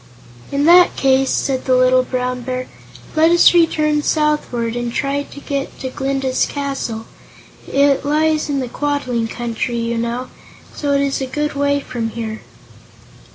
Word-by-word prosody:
"In 280 +1 +1
that 350 +2 +6
case," 270 0 +2
said 265 -2 -1
the 255 - +3
Little 255 0 +4
Brown 250 0 -3
Bear, 255 +1 -4 0.5
"let 315 +1 +5
us 345 +1 +6
return 305 -3 +3
southward 295 -7 0
and 240 0 -3
try 280 +3 -1
to 285 - -10
get 280 -1 -4
to 260 - -5
Glinda's 270 -1 -1
castle. 270 -6 -4 0.7
It 280 0 +3
lies 305 +1 +1
in 280 -2 0
the 255 - -3
Quadling 255 -4 -2
Country, 235 +1 -3
you 230 0 -1
know, 235 +2 -3 0.4
so 285 -1 -1
it 280 - +2
is 275 -1 -1
a 265 - -2
good 295 +3 -2
way 285 0 +1
from 240 -4 -4
here." 220 -1 -5
270 Hz, 155 wpm, -18 LUFS, 245-290 Hz, 0.7 s, that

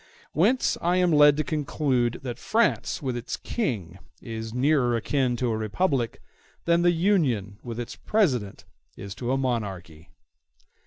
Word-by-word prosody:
Whence 220 +11 +2
I 175 +1 +2
am 180 -1 +3
led 145 -1 +6
to 155 - +1
conclude 135 -5 -1
that 120 -2 -5
France 225 -7 0
with 130 -2 -2
its 120 -1 -4
King 100 - -3 0.2
is 115 -1 -6
nearer 125 -1 +2
akin 125 +2 0
to 120 -1 0
a - - 0
republic 120 - -1 0.4
than 170 0 +3
the 175 - +4
Union 150 - +1
with 120 -1 -6
its 120 - -5
President 125 - 0 0.3
is 100 -1 -7
to 120 +5 -3
a 135 - +2
monarchy. 95 -11 -4
125 Hz, 150 wpm, -26 LUFS, 115-155 Hz, 0.4 s, led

